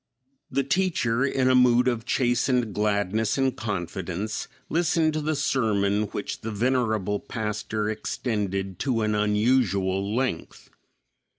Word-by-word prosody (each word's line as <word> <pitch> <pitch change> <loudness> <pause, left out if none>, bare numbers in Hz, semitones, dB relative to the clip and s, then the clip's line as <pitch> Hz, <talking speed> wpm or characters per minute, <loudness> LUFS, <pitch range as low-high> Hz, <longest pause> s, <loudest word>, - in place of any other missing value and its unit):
The 140 - 0
teacher, 140 -7 +1
in 135 -1 +1
a 130 - +5
mood 125 -1 +5
of 120 -2 0
chastened 125 -3 +1
gladness 105 +1 0
and 135 -2 +1
confidence, 95 0 -4 0.2
listened 165 -1 +1
to 155 - -1
the 155 +1 -1
sermon 105 -7 +1
which 105 0 -5
the 110 - -4
venerable 110 -3 0
pastor 105 -3 -3
extended 100 -4 -3
to 120 -5 0
an 105 0 +1
unusual 105 -2 +1
length. 125 -10 -3
110 Hz, 120 wpm, -25 LUFS, 105-130 Hz, 0.2 s, a